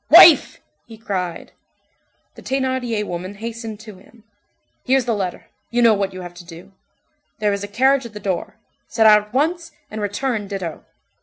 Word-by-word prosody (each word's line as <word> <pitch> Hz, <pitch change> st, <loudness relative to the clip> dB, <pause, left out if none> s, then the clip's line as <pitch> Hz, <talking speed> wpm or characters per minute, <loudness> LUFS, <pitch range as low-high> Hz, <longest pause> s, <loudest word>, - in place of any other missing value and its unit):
"Wife!" -, -, +8 dB, 0.3 s
he 225 Hz, -, -12 dB
cried. 185 Hz, -5 st, -4 dB, 0.8 s
The -, -, -14 dB
Thénardier 260 Hz, -5 st, -1 dB
woman 185 Hz, +1 st, -6 dB
hastened 225 Hz, 0 st, -7 dB
to 215 Hz, -3 st, -11 dB
him. 220 Hz, +3 st, -21 dB, 0.6 s
"Here's 260 Hz, -1 st, +2 dB
the 235 Hz, -, 0 dB
letter. 190 Hz, -4 st, -4 dB, 0.2 s
You 240 Hz, 0 st, +1 dB
know 230 Hz, -2 st, +6 dB
what 200 Hz, -1 st, -1 dB
you 185 Hz, -, -8 dB
have 175 Hz, -1 st, -9 dB
to -, -, -16 dB
do. 170 Hz, +2 st, -13 dB, 0.7 s
There 210 Hz, -2 st, +1 dB
is 200 Hz, 0 st, -3 dB
a -, -, -4 dB
carriage 260 Hz, +4 st, +2 dB
at 225 Hz, -, -17 dB
the 210 Hz, -, -7 dB
door. 190 Hz, -4 st, -3 dB, 0.3 s
Set 225 Hz, -, +1 dB
out 210 Hz, -1 st, +8 dB
at -, -, -25 dB
once, 330 Hz, +6 st, -1 dB, 0.2 s
and 215 Hz, 0 st, -5 dB
return 205 Hz, +1 st, -2 dB
ditto." 190 Hz, -5 st, -5 dB
210 Hz, 175 wpm, -20 LUFS, 195-240 Hz, 0.8 s, Wife